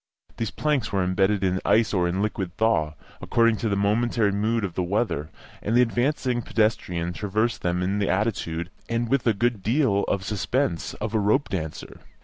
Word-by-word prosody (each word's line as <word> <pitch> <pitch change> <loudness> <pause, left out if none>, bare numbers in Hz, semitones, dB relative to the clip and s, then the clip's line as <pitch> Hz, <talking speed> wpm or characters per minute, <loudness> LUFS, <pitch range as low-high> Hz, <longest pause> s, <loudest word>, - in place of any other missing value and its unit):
These 115 - -2
planks 140 -5 -1
were 95 -2 +1
embedded 95 +2 +1
in 95 0 +1
ice 110 0 +3
or 90 -3 +2
in 95 +3 -1
liquid 95 -4 -3
thaw, 80 -10 +1 0.3
according 115 -1 +2
to 110 - -1
the 100 - +1
momentary 105 +1 +1
mood 110 +3 0
of 95 -4 -3
the 90 - -1
weather, 90 -5 -1 0.3
and 115 +3 +1
the 125 - +7
advancing 125 +1 0
pedestrian 90 -7 0
traversed 110 +5 -1
them 90 0 0
in 100 +3 0
the 100 - 0
attitude, 90 -4 -1 0.2
and 115 0 -1
with 135 -2 +1
a 115 - +5
good 120 0 0
deal 110 -2 +2
of 100 - -1
the - - -9
suspense, 105 - -1
of 110 +1 -4
a 110 - +2
rope 110 +7 +2
dancer. 80 -5 -5
105 Hz, 190 wpm, -25 LUFS, 95-115 Hz, 0.3 s, the